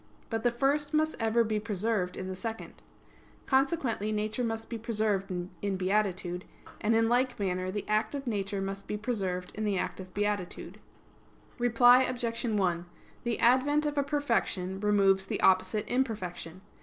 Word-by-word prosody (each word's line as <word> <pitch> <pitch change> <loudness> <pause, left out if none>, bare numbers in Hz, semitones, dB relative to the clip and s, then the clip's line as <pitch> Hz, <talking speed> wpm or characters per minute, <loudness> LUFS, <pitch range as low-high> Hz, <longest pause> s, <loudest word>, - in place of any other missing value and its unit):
But 225 -1 -1
the 240 - +3
first 285 +5 +1
must 310 +1 +2
ever 225 +1 +3
be 215 -1 -1
preserved 205 -3 -1
in 185 - -4
the 190 - -4
second. 225 +4 -6 0.7
Consequently 265 -6 +1
nature 215 +3 -1
must 225 -1 -3
be 230 - -5
preserved 215 -3 0 0.3
in 200 -2 -1
beatitude: 185 -2 0 0.4
and 220 +2 +2
in 225 0 +4
like 250 +1 +1
manner 185 -2 -1
the 205 +2 -4
act 215 +6 +1
of 275 -1 -4
nature 200 -4 -2
must 195 0 -5
be 210 - -2
preserved 190 -5 -2
in 215 - -4
the 205 -2 +1
act - - -3
of 185 -1 -9
beatitude. 205 -3 -2 0.8
Reply 245 +1 +6
Obj. 245 -2 -1
1: 185 -6 0 0.4
The 235 -1 0
advent 285 +5 +4
of 295 0 -1
a 285 - +3
perfection 230 -10 -1
removes 195 -2 +3
the - - -2
opposite 190 +2 +3
imperfection. 190 -8 -2
215 Hz, 160 wpm, -30 LUFS, 195-240 Hz, 0.8 s, Reply